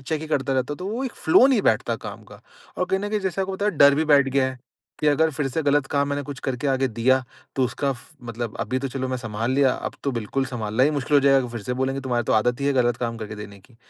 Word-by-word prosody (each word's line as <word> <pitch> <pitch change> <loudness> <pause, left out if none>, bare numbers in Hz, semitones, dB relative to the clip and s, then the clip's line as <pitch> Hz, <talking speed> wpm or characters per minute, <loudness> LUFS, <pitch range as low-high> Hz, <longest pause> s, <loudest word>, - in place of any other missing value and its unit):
Check 155 +3 -3
ही - - -5
करता 135 -3 0
रहता 130 +2 0
हूँ। - - -6
तो 185 - -5
वो 240 +6 -3
एक 255 - -4
फ्लो 200 +11 +7
नहीं 255 -7 +3
बैठता - - +1
काम - - -7
का। - - -13 0.4
और 180 - +1
कहीं 190 +1 0
न 205 - -3
कहीं, 210 -1 -1
जैसे 190 0 -2
आपको 190 0 -2
पता 200 - -3
है, - - +3
डर 140 0 +7
भी 155 +3 +1
बैठ 140 -3 +4
गया 135 0 +2
है 130 - -11 0.4
कि 150 - 0
अगर 160 +2 +3
फ़िर 145 -1 -2
से 155 +5 -2
गलत 145 -1 +2
काम 140 0 +2
मैंने 145 0 -2
कुछ 140 -1 -7
करके 130 +1 -3
आगे 135 0 +2
दिया। 125 +3 +2 0.3
तो 130 - +3
उसका 135 +3 -1
फ़ 120 - -13 0.2
मतलब 115 -1 -5
अभी 130 - -1
तो 135 - -3
चलो 130 0 -3
मैं 130 - -1
सँभाल 115 0 -3
लिया, 130 -1 +3
अब - - -5
तो 140 - +1
बिल्कुल 120 +4 -2
सँभालना 115 -2 -1
ही 145 - +4
मुश्किल 145 0 -1
हो - - +6
जाएगा 135 -1 +5
कि - - -8
फ़िर 115 -3 -5
से 125 - -3
बोलेंगे, 135 +1 -1
तुम्हारी 125 -3 -1
तो - - 0
आदत 120 +4 +2
ही 140 - 0
है 140 - +3
गलत 120 -2 +2
काम 115 0 -3
करके 110 -1 -6
देने 100 -1 -9
की। 115 +3 -23
135 Hz, 300 wpm, -23 LUFS, 125-145 Hz, 0.4 s, फ्लो